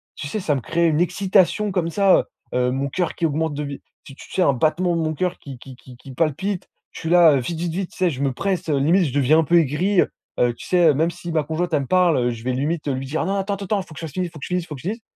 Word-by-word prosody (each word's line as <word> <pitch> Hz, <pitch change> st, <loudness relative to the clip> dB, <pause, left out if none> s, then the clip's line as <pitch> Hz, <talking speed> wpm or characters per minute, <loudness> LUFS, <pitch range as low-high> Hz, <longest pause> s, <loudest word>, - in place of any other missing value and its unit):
tu -, -, -7 dB
sais, 215 Hz, -, -3 dB
ça 155 Hz, -7 st, 0 dB
me 135 Hz, -, -3 dB
créait 170 Hz, +6 st, +1 dB
une 155 Hz, 0 st, +1 dB
excitation 190 Hz, +3 st, +2 dB
comme 175 Hz, -3 st, -1 dB
ça, 195 Hz, +1 st, +4 dB, 0.3 s
heu, -, -, 0 dB
heu, 125 Hz, 0 st, +1 dB
mon 135 Hz, +2 st, -2 dB
coeur 175 Hz, +5 st, -1 dB
qui 170 Hz, -, -1 dB
augmente 160 Hz, +1 st, -1 dB
de 145 Hz, +1 st, -3 dB
vi 140 Hz, -1 st, -6 dB, 0.2 s
tu 135 Hz, -, -12 dB
tu -, -, -14 dB
sais? -, -, 0 dB
Un 140 Hz, -, +4 dB
battement 165 Hz, +6 st, +1 dB
de 165 Hz, -, 0 dB
mon 155 Hz, -1 st, -1 dB
coeur 180 Hz, +3 st, -2 dB
qui 135 Hz, -3 st, -10 dB
qui 130 Hz, -1 st, -12 dB
qui 125 Hz, 0 st, -15 dB
qui 135 Hz, -, -12 dB
palpite. 175 Hz, +6 st, -1 dB, 0.2 s
Je -, -, -10 dB
suis 165 Hz, -, -3 dB
là, 170 Hz, -3 st, +7 dB
heu, -, -, +2 dB
vite 160 Hz, +6 st, -4 dB
vite 170 Hz, -1 st, -2 dB
vite, 190 Hz, 0 st, -3 dB
tu -, -, -16 dB
sais? 185 Hz, -2 st, +2 dB
Je 135 Hz, -3 st, -5 dB
me 135 Hz, -2 st, 0 dB
presse, 190 Hz, +4 st, -2 dB
heu, 145 Hz, -, +2 dB
limite 170 Hz, +6 st, +3 dB
je 135 Hz, -, -3 dB
deviens 145 Hz, +2 st, +4 dB
un -, -, +3 dB
peu 170 Hz, +3 st, +3 dB
aigri, 175 Hz, +6 st, +2 dB
heu, -, -, 0 dB, 0.3 s
heu, 120 Hz, -1 st, +3 dB
tu -, -, -11 dB
sais, 175 Hz, -2 st, +3 dB
heu? -, -, +4 dB
Même 165 Hz, +3 st, +1 dB
si 175 Hz, 0 st, -7 dB
ma 155 Hz, -2 st, +1 dB
conjointe, 160 Hz, +4 st, -2 dB
elle 145 Hz, -, +2 dB
me 135 Hz, -, -6 dB
parle, 180 Hz, -3 st, +3 dB
heu, 120 Hz, -1 st, +1 dB
je 115 Hz, -1 st, -8 dB
vais 130 Hz, +1 st, -1 dB
limite, 150 Hz, +4 st, -2 dB
heu, 140 Hz, -, +1 dB
lui 130 Hz, +1 st, -4 dB
dire: 150 Hz, +4 st, -2 dB
«Non 195 Hz, +1 st, -1 dB
attends 200 Hz, 0 st, -2 dB
ten 200 Hz, -, -7 dB
ten 200 Hz, -1 st, 0 dB
faut 160 Hz, -, -14 dB
que -, -, -9 dB
ça 165 Hz, -, -5 dB
finisse, 180 Hz, +3 st, -4 dB
faut 160 Hz, -, -11 dB
que -, -, -11 dB
je -, -, -7 dB
finisse, 180 Hz, -1 st, -1 dB
faut 150 Hz, -, -7 dB
que 130 Hz, -, -11 dB
je 170 Hz, -, -6 dB
finisse» 225 Hz, +3 st, -5 dB
160 Hz, 335 wpm, -22 LUFS, 140-180 Hz, 0.3 s, là